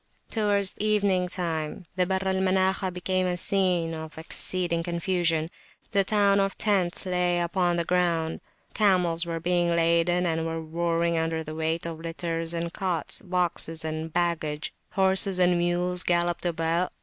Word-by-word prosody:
Towards 205 -3 +2
evening 200 -4 +2
time 170 -2 -3
the 180 -1 +1
Barr 190 0 -1
al 190 0 0
Manakhah 190 0 +1
became 185 +1 -1
a 180 0 -1
scene 180 -3 +1
of 160 0 -8
exceeding 170 +1 -1
confusion. 170 -2 -1 0.4
The 200 -1 +4
town 200 0 +3
of 195 0 0
tents 190 -5 +1
lay 180 -1 +1
upon 175 0 0
the 170 - 0
ground. 170 -3 0 0.3
Camels 180 -5 +2
were 165 -1 -3
being 175 0 +1
laden, 170 +2 +2
and 165 -1 0
were 165 0 -3
roaring 170 +1 -1
under 160 0 -2
the 155 - -7
weight 160 +2 -2
of 165 -1 -5
litters 165 0 -3
and 170 0 -3
cots, 180 -5 0
boxes 175 -3 -1
and 160 +1 -4
baggage. 165 -3 -1 0.2
Horses 190 0 +4
and 180 -1 +4
mules 175 +1 +1
galloped 175 0 +1
about. 165 +1 0
175 Hz, 150 wpm, -26 LUFS, 165-185 Hz, 0.4 s, The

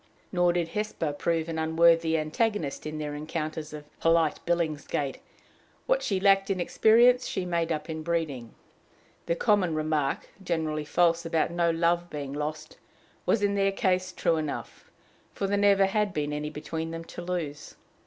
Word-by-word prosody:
Nor 175 -1 +3
did 170 -1 -1
Hesper 190 -6 -2
prove 165 +2 -1
an 165 -1 -3
unworthy 165 0 +4
antagonist 155 -1 -1
in 155 0 -5
their 150 -1 -4
encounters 155 +1 -4
of 150 -1 -8
polite 165 -2 +3
Billingsgate: 155 -4 -1 0.7
what - - +2
she 195 -2 0
lacked 195 0 +4
in 195 -2 0
experience 240 +7 +4
she 185 - -3
made 170 -1 -1
up 155 -1 -2
in 160 -1 -4
breeding. 155 -8 -3 0.7
The 170 - +1
common 190 -4 +2
remark, 155 -3 -1 0.2
generally 160 -4 -1
false, 170 +2 +2
about 165 0 0
no 170 0 +1
love 170 +1 +1
being 140 -3 -5
lost, 150 +1 -5 0.5
was 210 - +2
in 200 0 +2
their 195 0 +2
case 185 -1 0
true 170 -2 +1
enough, 155 -2 -5 0.5
for 200 - -2
there 200 +1 +1
never 200 -1 +4
had 205 0 0
been 150 -1 -1
any 150 0 -3
between 160 +2 -5
them 165 0 -6
to 175 - -9
lose. 175 -5 -4
165 Hz, 165 wpm, -27 LUFS, 155-185 Hz, 0.7 s, unworthy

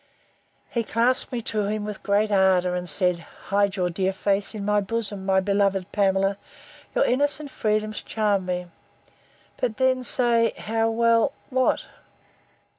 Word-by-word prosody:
He 235 - 0
clasped 235 +3 +1
me 240 -2 -3
to 210 -2 -1
him 210 0 -2
with 210 -2 -6
great 210 +1 +1
ardour, 190 -2 +3
and 180 -1 -1
said, 180 +2 +2 0.3
Hide 200 0 +2
your 180 -2 -1
dear 190 +2 0
face 200 +2 -1
in 200 -2 -5
my 210 0 +2
bosom, 205 -2 -3
my 190 0 +4
beloved 195 -1 0
Pamela! 195 -1 +1 0.6
your - - +3
innocent 285 +2 0
freedoms 215 0 -1
charm 205 -4 -1
me!—But 180 +5 -7
then 260 -1 +2
say, 235 -2 +3
How 225 +1 0
well—what? 235 +3 +1
210 Hz, 135 wpm, -24 LUFS, 190-230 Hz, 0.6 s, my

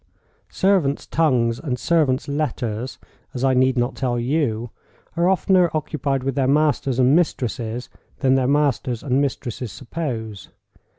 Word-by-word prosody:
Servants' 185 -8 +1
tongues 120 -7 +1
and 130 -6 -3
servants' 145 -4 +1
letters—as 130 -3 -4
I 135 -1 +3
need 130 +1 +3
not 120 +2 +1
tell 125 -2 -1
you—are 125 - -2
oftener 185 -1 +3
occupied 145 -3 -1
with 135 0 -1
their 135 -1 +1
masters 140 -3 +2
and 130 +2 +4
mistresses 125 -7 -1 0.3
than 130 -2 +2
their 130 -1 +2
masters 135 -4 +1
and 135 -1 +1
mistresses 125 -4 -3
suppose. 115 - -5
130 Hz, 125 wpm, -22 LUFS, 120-150 Hz, 0.3 s, and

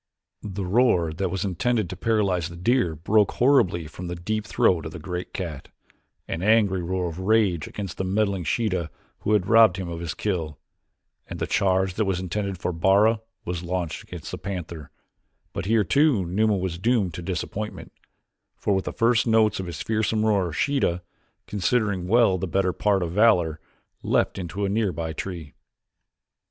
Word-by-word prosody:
The 100 -1 -5
roar 90 -6 +2
that 95 +3 -2
was 95 +2 -2
intended 110 +3 0
to - - -5
paralyze 95 -5 0
the 85 - -10
deer 90 -2 +1
broke 105 +6 +2
horribly 100 - +3
from 90 +4 -8
the 90 - -4
deep 110 +5 -3
throat 85 -3 +2
of 80 - -9
the - - -6
great 90 +2 -5
cat 85 -7 -5 0.6
an 80 - -4
angry 100 -2 +3
roar 90 +1 -2
of 85 +1 -6
rage 95 -5 +2
against 100 -4 -6
the - - 0
meddling 100 -1 0
Sheeta 90 -2 -1 0.3
who 105 - 0
had 105 -4 +3
robbed 110 -3 +6
him 95 -2 -4
of 85 -1 -5
his 85 -2 -4
kill, 80 -8 -2 0.7
and - - -6
the - - -2
charge 95 -1 +1
that 110 +3 0
was 95 -2 0
intended 95 +1 -3
for 90 - -3
Bara 100 +6 +3 0.2
was 90 -1 -3
launched 90 -2 -3
against - - -9
the - - -5
panther; 85 -5 -6 0.6
but - - -4
here 110 0 +3
too 135 - +3
Numa 105 +4 +1
was 90 -2 -3
doomed 105 -4 +1
to 85 - -6
disappointment, 95 +4 -5 0.7
for 100 - 0
with 95 -1 0
the - - -4
first 115 +1 +2
notes 110 -2 +3
of 95 - -4
his 85 -3 -5
fearsome 110 0 0
roar 100 -5 +2
Sheeta, 90 - 0 0.4
considering 100 -2 0
well 110 -3 +4
the 95 - -2
better 95 +1 +1
part 100 -3 +1
of 85 - -3
valor, 90 -6 +3 0.4
leaped - - 0
into 95 +3 -3
a - - 0
near 105 0 +1
by 80 0 -4
tree. 80 -4 -6
95 Hz, 180 wpm, -25 LUFS, 85-105 Hz, 0.7 s, robbed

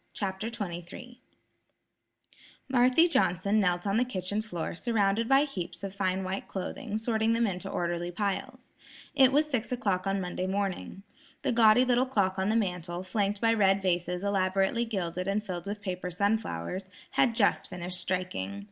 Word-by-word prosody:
CHAPTER 195 +1 -3
XXIII 205 +3 -7 1.5
Marthy 255 +5 +5
Johnson 200 - +2
knelt 180 -2 +1
on 200 +1 +1
the 245 - +4
kitchen 205 -3 -2
floor 175 -7 -4
surrounded 220 +2 +1
by 270 +1 +6
heaps 180 - -5
of 195 -1 -4
fine 190 -1 -1
white 190 +1 -4
clothing 215 +3 -4
sorting 220 0 +1
them 230 0 +2
into 185 -4 -3
orderly 175 0 -2
piles. 200 +2 -3 0.4
It 270 -3 +6
was 300 +3 +3
six 255 -4 -2
o'clock 200 -7 0
on 195 0 +1
Monday 180 0 -3
morning. 195 0 -3 0.4
The - - +1
gaudy 230 +1 +6
little 250 +1 +2
clock 195 -6 +1
on 190 +2 +1
the 220 - +2
mantel, 180 -4 -2
flanked 200 +1 -1
by 225 0 +4
red 195 -3 +4
vases 180 0 0
elaborately 195 +3 +1
gilded 185 -4 -3
and 205 +2 0
filled 180 -2 -5
with 205 0 -5
paper 180 -2 -3
sunflowers, 190 - -1 0.3
had 240 -4 +2
just 215 -4 +2
finished 180 0 -5
striking. 175 - -3
195 Hz, 160 wpm, -29 LUFS, 180-225 Hz, 1.5 s, by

